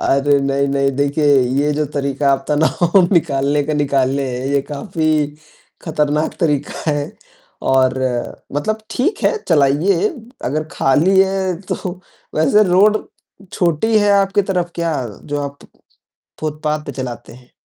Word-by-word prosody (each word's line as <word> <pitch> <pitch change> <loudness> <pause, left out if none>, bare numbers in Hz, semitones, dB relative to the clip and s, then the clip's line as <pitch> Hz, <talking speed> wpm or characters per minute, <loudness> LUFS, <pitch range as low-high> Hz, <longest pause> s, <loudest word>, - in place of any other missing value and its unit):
अरे, 140 +1 +2
नहीं, 140 0 0
नहीं, 140 0 +1
देखिए 145 +1 +1 0.3
ये 150 +1 +1
जो 150 +1 0
तरीक़ा 140 0 0
आप 135 0 -1
तनाव 160 +5 +3
निकालने 145 -3 +2
का 155 - -2
निकाले 140 -1 +1
हैं, 125 +1 -4
ये 140 - +3
काफ़ी 155 +1 0 0.6
ख़तरनाक 150 -1 0
तरीक़ा 150 0 -1
है 145 -1 -2 0.6
और 130 -1 +3 0.6
मतलब 215 +10 -1
ठीक 285 - -1
है - - +3
चलाइए 160 +4 +3 0.4
अगर 155 +5 -1
ख़ाली 165 +8 +3
है 190 -1 +1 0.2
तो 180 0 -5 0.3
वैसे 205 +7 +4
रोड 205 +4 +4 0.5
छोटी 180 +6 +1
है 205 0 +3
आपकी 200 0 +3
तरफ़ 175 -1 -1
क्या 170 -2 -1 0.3
जो 145 0 -3
आप 140 0 -6 0.8
फुटपाथ 150 0 -2
पे - - -5
चलाते 125 -3 -6
हैं। 125 +1 -17
150 Hz, 135 wpm, -18 LUFS, 140-175 Hz, 0.8 s, वैसे